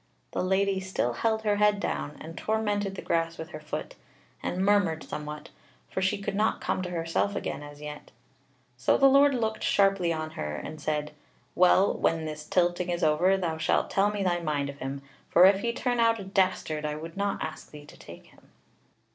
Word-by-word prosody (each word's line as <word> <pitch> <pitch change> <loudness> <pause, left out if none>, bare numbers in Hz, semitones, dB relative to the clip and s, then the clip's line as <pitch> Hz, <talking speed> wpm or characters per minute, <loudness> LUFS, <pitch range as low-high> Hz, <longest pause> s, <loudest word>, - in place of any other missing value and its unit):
The - - -2
Lady 190 +1 +1
still 185 -10 -1
held 220 - 0
her 205 -1 +2
head 210 0 +3
down, 75 - -3
and 165 +1 -9
tormented 205 -2 -1
the - - -7
grass 165 0 0
with 160 +1 -7
her 155 - -8
foot, 155 0 -5 0.5
and 185 +2 -1
murmured 195 -6 +2
somewhat; 150 +1 -7 0.4
for 190 - -2
she 190 +2 +1
could 200 0 -4
not 215 +2 +1
come - - -1
to 180 - -4
herself 170 +4 -1
again - - -3
as 145 0 -11
yet. 150 0 -8 0.7
So - - +3
the 275 - +4
Lord 275 +1 +6
looked 220 -2 -1
sharply 195 -3 +3
on 155 -1 -3
her 75 - -4
and 155 - -7
said: 150 0 -2 0.4
"Well, 185 +2 +5
when 165 -1 0
this 155 0 -6
tilting 175 0 +1
is 175 0 -1
over, 170 +5 +3
thou 165 -4 -2
shalt 160 - +1
tell 200 +1 +3
me 205 -1 -2
thy 175 -2 +1
mind 145 -4 -1
of 140 - -16
him; 135 +1 -5 0.3
for 175 - +7
if 195 0 +6
he 235 +3 -1
turn 245 0 -1
out 230 -1 +3
a - - -6
dastard 185 -5 0
I 150 0 -2
would 165 +2 -8
not 200 0 -1
ask 155 0 -7
thee 150 -1 -12
to - - -15
take - - -13
him." - - -22
180 Hz, 205 wpm, -28 LUFS, 155-200 Hz, 0.7 s, for